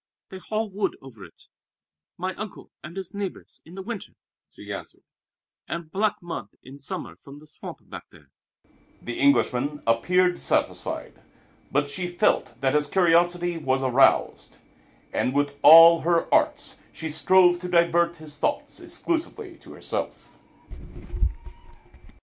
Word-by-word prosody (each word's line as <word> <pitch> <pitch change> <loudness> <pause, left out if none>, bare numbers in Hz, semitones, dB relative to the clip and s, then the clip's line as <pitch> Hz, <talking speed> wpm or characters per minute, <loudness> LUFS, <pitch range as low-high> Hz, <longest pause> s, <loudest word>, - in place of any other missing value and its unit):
"They 190 - -9
haul 215 +3 -3
wood 200 0 -3
over 115 -7 -13
it, - - -15 0.7
my 185 +1 -3
uncle 215 0 -9
and 170 +5 -9
his 190 -2 -6
neighbors, 200 -2 -7
in 170 - -13
the 190 - -7
winter," 225 -1 -7 0.4
she - - -9
answered, - - -10 0.6
"and 165 +1 -6
black 205 +2 +1
mud 165 -12 -6
in 135 +2 -12
summer 105 -10 -6
from 140 +9 -14
the 150 - -15
swamp 150 - -11
back - - -10
there." - - -20 0.7
The 120 - -6
Englishman 140 +1 +1
appeared 175 +11 +2
satisfied; - - -2 0.5
but 145 +1 +1
she 180 +5 -4
felt 175 - 0
that 135 0 +1
his 150 0 +2
curiosity 175 0 +2
was 135 -3 0
aroused, 130 +1 +2 0.6
and 130 - -1
with 145 0 -1
all 165 +2 +9
her 170 0 +2
arts - - +1
she 160 - -6
strove 175 +3 +4
to 180 - -6
divert 170 0 +2
his 155 -3 -9
thoughts - - -2
exclusively 345 +3 -4
to - - -14
herself. - - -5
170 Hz, 140 wpm, -25 LUFS, 145-185 Hz, 0.7 s, all